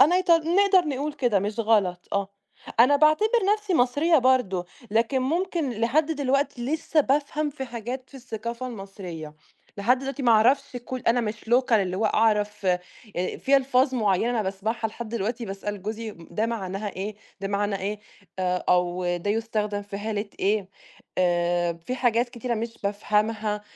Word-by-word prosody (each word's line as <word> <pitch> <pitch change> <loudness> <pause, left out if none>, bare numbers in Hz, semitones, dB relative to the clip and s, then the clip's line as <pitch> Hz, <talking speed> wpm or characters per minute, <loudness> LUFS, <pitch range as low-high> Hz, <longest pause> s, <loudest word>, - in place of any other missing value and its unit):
أنا 345 +6 +6
إيط 370 -1 0
نقدر 350 +2 +4
نقُول 290 +2 -2
كده، 240 -8 +1
مش 210 +4 -2
غلط، 200 -6 +1
آه، 200 -1 0 0.5
أنا 285 +4 +6
باعتبر 310 +8 +4 0.3
نَفْسي 420 -3 -3
مصرية 295 +5 +3
برضو، 250 -9 +2 0.3
لكن 235 +4 +2
ممكن 330 0 0
لحد 240 +8 +1
دلوقتي 275 -3 0
لِسّه 315 +2 +1
بافهم 295 +2 0
في 270 -2 -6
حاجات 245 +2 -6
في - - -20
الثقافة 235 0 -5
المصرية، 190 -8 -8 0.4
لحد 240 +6 +3
دلوقتي 275 +2 -5
ما 235 -3 +5
أعرفش 245 +4 +3
كل 255 -1 -4
أنا 240 +1 +4
مش 215 -2 -3
local 245 +2 +2
اللي 190 -4 +2
هو 215 +3 +1
أعرف 210 -2 +1
آآ، 180 -1 +3 0.6
في 275 +1 +3
ألفاظ 265 0 +2
معيّنة 220 +1 +1
باسمعها 210 +4 -2
لحد 225 +1 -7
دلوقتي 230 +2 -2
باسأل 200 0 -5
جوزي: 220 +1 -4
"مم 170 -3 -15
ده 220 +1 0
معناها 205 -2 -3
إيه؟ 200 +2 -5 0.3
ده 195 - -3
معناه 200 0 0
إيه؟ 205 +2 -3 0.4
آآ، 180 -1 0
أو 180 0 +2
ده 190 +4 -2
يستخدم 210 -2 -1
في 200 0 -7
حالة 210 0 -2 0.2
إيه؟" 200 -1 +1 0.5
آآ، 175 -1 +2
فيه 170 +9 -6
حاجات 240 -1 +2
كتيرة 240 0 -3
مش 230 +1 -4
بافهمها، 210 +1 0
225 Hz, 160 wpm, -25 LUFS, 200-260 Hz, 0.6 s, أنا